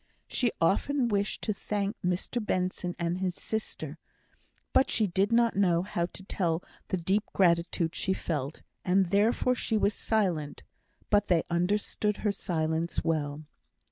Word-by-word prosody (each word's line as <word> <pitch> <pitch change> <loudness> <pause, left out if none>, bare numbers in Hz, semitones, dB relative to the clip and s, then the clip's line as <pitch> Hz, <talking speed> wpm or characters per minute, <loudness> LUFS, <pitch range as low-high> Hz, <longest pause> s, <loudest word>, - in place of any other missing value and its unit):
She 240 -3 +1
often 240 +9 +2
wished 205 -1 -1
to 215 - 0
thank 205 +1 -2
Mr 180 +6 -1
Benson 180 -2 -1
and 170 +1 -1
his 185 -2 -1
sister, 220 0 -4 0.7
but 270 - +4
she 220 - +2
did 195 +2 +1
not 235 0 +4
know 180 -3 +3
how 175 -3 -1
to 190 - -10
tell 175 -3 -1 0.2
the 185 - 0
deep 190 +5 +1
gratitude 170 -2 +2
she 190 - 0
felt, 150 -5 -3 0.2
and 185 0 +3
therefore 220 +5 +3
she 225 -2 0
was 205 0 +2
silent. 180 -12 -1 0.5
But 205 -1 +4
they 170 -3 +3
understood 205 +4 0
her 210 - +4
silence 165 -3 -1
well. 155 -2 -1
190 Hz, 145 wpm, -29 LUFS, 170-210 Hz, 0.7 s, but